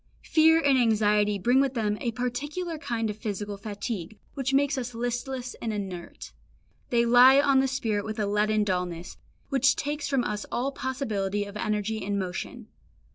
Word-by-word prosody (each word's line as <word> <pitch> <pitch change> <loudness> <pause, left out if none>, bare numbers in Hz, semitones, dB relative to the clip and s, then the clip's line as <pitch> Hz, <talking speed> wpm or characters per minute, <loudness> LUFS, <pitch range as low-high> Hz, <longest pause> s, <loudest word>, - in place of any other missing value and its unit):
Fear 320 0 +5
and 275 -2 +4
anxiety 210 -3 +3
bring 245 +7 +3
with 270 -1 0
them 210 -2 -1
a 240 - 0
particular 295 +8 -3
kind 225 -7 -2
of 210 - -9
physical 205 -1 -4
fatigue 205 -1 -5 0.2
which 270 -1 -2
makes 280 +1 +2
us 245 -2 -4
listless 245 +2 -3
and 225 - -2
inert. 190 -4 -6 0.6
They 235 -1 +3
lie 250 +3 +7
on 275 -2 +4
the 270 - +2
spirit 225 -6 -1
with 215 +1 -5
a 210 - 0
leaden 210 +1 +1
dullness, 180 -3 -3 0.3
which 275 -1 +3
takes 295 +1 -3
from 270 -3 +1
us 210 -2 -3
all 260 +3 -1
possibility 215 -8 -2
of 200 0 -10
energy 210 0 -2
and 200 +1 -1
motion. 185 -2 -5
230 Hz, 170 wpm, -27 LUFS, 205-265 Hz, 0.6 s, lie